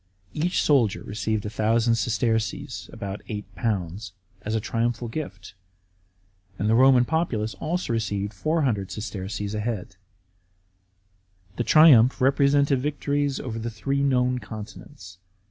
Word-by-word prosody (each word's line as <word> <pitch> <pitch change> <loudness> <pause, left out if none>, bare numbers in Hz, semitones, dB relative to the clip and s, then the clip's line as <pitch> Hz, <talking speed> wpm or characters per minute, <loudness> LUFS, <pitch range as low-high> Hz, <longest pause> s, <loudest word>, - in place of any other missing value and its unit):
Each 175 +4 0
soldier 120 -8 +2
received 110 0 -2
1000 115 +2 +1
sesterces 110 0 -1
(about 100 -2 -6
£8) 105 -3 -4 0.3
as 110 +2 -3
a - - +1
triumphal 115 +2 -2
gift; 110 -9 -7 1.0
and 105 - -1
the 110 - +3
Roman 130 +1 +6
populace 120 -9 -1
also 165 -5 -2
received 105 -2 -2
400 125 - 0
sesterces 100 0 -5
a 105 - -2
head. 105 -3 -4 1.6
The 120 - 0
triumph 135 -5 +6
represented 140 +1 +3
victories 145 0 -1
over 115 -2 -5
the 115 +1 -3
three 135 +6 -2
known 125 -2 +2
continents. 105 -2 -10
115 Hz, 115 wpm, -25 LUFS, 105-135 Hz, 1.6 s, Roman